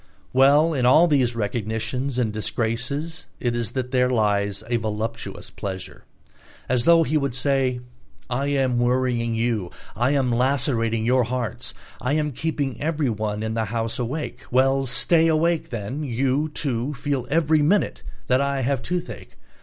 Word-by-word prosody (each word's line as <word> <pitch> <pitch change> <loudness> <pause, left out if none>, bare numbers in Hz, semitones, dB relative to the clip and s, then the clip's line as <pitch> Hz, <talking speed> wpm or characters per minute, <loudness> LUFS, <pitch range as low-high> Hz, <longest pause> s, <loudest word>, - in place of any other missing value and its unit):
Well, 145 +5 +5
in 130 -4 0
all 130 +7 +6
these 130 -7 +2
recognitions 115 +4 -2
and 115 -4 0
disgraces 125 +9 -2
it 120 -1 -1
is 120 -1 -2
that 125 -1 -3
there 125 -1 +3
lies 100 -3 +1
a 120 0 +1
voluptuous 110 0 -4
pleasure. 95 -2 -7 0.6
As 125 -1 +1
though 170 -1 +6
he 155 +1 +1
would 140 -4 -1
say: 130 -2 +1 0.5
"I 135 +3 -1
am 135 -4 +1
worrying 120 -2 +1
you, 115 -5 -1 0.3
I 120 +3 +1
am 130 -3 +1
lacerating 120 -3 +1
your 125 0 +3
hearts, 120 -2 -3 0.3
I 130 +3 0
am 150 -1 0
keeping 140 -1 -3
everyone 110 -9 -1
in 110 0 -2
the 110 0 0
house 115 +2 -3
awake. 135 +6 -3
Well, 135 +1 +2
stay 160 +6 +3
awake 165 +1 +1
then, 115 +5 -4
you, 135 +3 0
too, 140 -2 -2
feel 135 -2 -2
every 155 0 +3
minute 195 +8 +1 0.2
that 130 +1 +2
I 140 -1 0
have 135 0 0
toothache. 180 +3 -5
125 Hz, 155 wpm, -23 LUFS, 115-145 Hz, 0.6 s, all